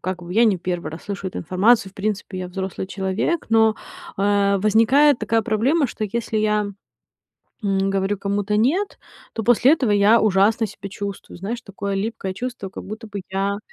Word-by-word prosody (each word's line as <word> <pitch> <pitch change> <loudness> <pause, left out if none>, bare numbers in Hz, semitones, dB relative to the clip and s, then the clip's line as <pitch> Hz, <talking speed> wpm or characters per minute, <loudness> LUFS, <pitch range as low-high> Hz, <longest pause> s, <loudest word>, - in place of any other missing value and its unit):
как 185 0 -4
бы 175 0 -7
я 230 +5 +5
не 210 -5 +3
1 175 -1 -4
раз 160 - -9
слышу 200 -1 -5
эту - - -7
информацию. 195 +5 +2
В - - -32
принципе, 200 -1 -3
я 180 -1 -4
взрослый 190 0 -4
человек, 195 - -2
но, 220 -1 +4 0.4
э, 200 0 +2
возникает 230 +8 +4
такая 225 -1 +1
проблема, 260 +9 +2
что 220 - -4
если 220 +1 -2
я, 210 -1 +1 1.0
м, 195 -1 +1
говорю 195 +1 0
кому-то 200 +1 -1
"нет", 320 - +1 0.3
то 225 - -3
после 245 +4 +5
этого 265 -8 +1
я 205 +3 +5
ужасно 215 +2 +3
себя 200 -1 -9
чувствую. 200 0 -7
Знаешь, 220 +6 -4
такое 200 -3 -5
липкое 195 -2 -3
чувство, 240 -1 -5
как - - -9
будто 220 +3 -8
бы 200 -1 -5
я, 200 +1 -1
205 Hz, 180 wpm, -22 LUFS, 195-225 Hz, 1.0 s, я